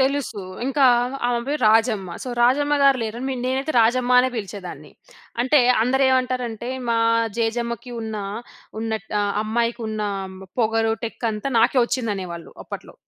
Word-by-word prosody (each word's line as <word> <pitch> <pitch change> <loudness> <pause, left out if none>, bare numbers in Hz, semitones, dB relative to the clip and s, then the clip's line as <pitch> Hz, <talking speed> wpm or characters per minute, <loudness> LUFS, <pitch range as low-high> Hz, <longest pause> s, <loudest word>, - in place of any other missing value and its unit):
తెలుసు. 265 -6 0 0.2
ఇంకా, 270 0 +3 0.4
ఆమె 245 -1 +1
పేరు 295 0 -2
రాజమ్మ. 220 -4 +2
సో, 255 - -6
రాజమ్మ 285 +4 +3
గారు 275 -2 +5
లేరని, 240 +4 -3
నేనైతే 270 +4 -1
రాజమ్మ 245 +2 +2
అనే 260 - +1
పిలిచేదాన్ని. 200 -4 -7 0.5
అంటే, 260 +3 +4 0.2
అందరు 265 +3 +2
ఏమంటారంటే, 250 -3 -1 0.2
మా 230 -1 +2 0.4
జేజమ్మకి 235 +1 -2
ఉన్న, 220 -1 -4 0.6
ఉన్నట్ 220 -1 -3 0.3
అమ్మాయికి 235 +2 -1
ఉన్న, 215 -1 -3 0.6
పొగరు, 225 0 +2
టెక్ 230 +1 -6
అంతా 215 +6 -4
నాకే 245 +3 +3
వచ్చింది 240 -3 -1
అనేవాళ్ళు. 170 -3 -7
అప్పట్లో. - - -9
235 Hz, 135 wpm, -22 LUFS, 220-260 Hz, 0.6 s, గారు